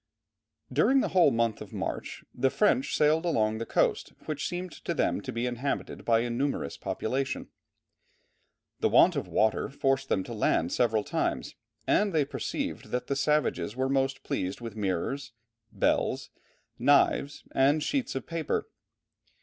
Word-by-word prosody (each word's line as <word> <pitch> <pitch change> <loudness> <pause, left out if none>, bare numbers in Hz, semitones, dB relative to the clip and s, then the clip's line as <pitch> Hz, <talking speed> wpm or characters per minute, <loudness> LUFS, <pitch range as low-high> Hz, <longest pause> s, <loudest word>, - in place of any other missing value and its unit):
During 245 - +4
the - - -1
whole 180 -5 +5
month 115 -3 0
of - - -9
March - - -4
the 135 +2 +2
French 210 - +2
sailed 155 +2 +3
along 110 -10 +1
the 115 - -4
coast, - - +1
which 155 -1 -2
seemed 180 0 -4
to 170 - -2
them - - +1
to 130 - -5
be 120 +1 -2
inhabited 125 +3 -3
by 115 -1 +4
a 120 - -2
numerous 135 +4 -1
population. 135 +4 -3 1.3
The - - +2
want - - +6
of - - -2
water 110 -4 +1
forced 135 -1 0
them 95 - +1
to 120 - -7
land 90 -5 +1
several 110 -3 +2
times, - - -2 0.3
and 205 -2 +2
they 155 -3 +3
perceived - - -4
that 125 - -2
the 140 - -1
savages 135 - 0
were 130 +1 0
most 135 0 0
pleased 95 +1 -2
with 115 -3 -7
mirrors, 105 +6 -2 0.4
bells, - - 0 0.5
knives, 140 +2 +3
and 145 +3 +3
sheets 265 - -1
of 135 - -3
paper. 165 -2 -2
135 Hz, 155 wpm, -28 LUFS, 115-150 Hz, 1.3 s, want